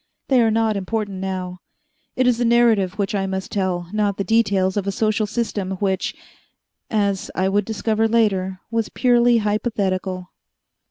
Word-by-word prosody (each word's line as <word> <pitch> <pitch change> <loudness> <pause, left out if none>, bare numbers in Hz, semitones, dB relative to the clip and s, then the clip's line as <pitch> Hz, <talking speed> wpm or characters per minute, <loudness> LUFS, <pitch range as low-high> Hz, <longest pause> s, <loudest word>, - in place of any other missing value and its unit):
They 260 -3 +5
are 225 - +3
not 220 -1 +1
important 200 0 -3
now. 185 -1 -4 0.6
It 255 - +2
is 245 -2 +2
the - - +1
narrative 230 -5 +3
which 200 -1 -1
I 195 -1 0
must 190 0 -4
tell, 185 -3 -1
not 205 -2 0
the 200 - -1
details 200 -4 +2
of 200 -1 -2
a - - +1
social 215 +1 0
system 205 -4 -2
which, 190 0 -1 0.7
as 200 -3 0
I 185 0 +1
would 200 +1 +1
discover 220 +1 0
later, 195 -5 +1
was 225 -1 -1
purely 240 -1 +3
hypothetical. 195 -4 -1
205 Hz, 160 wpm, -21 LUFS, 190-225 Hz, 0.7 s, They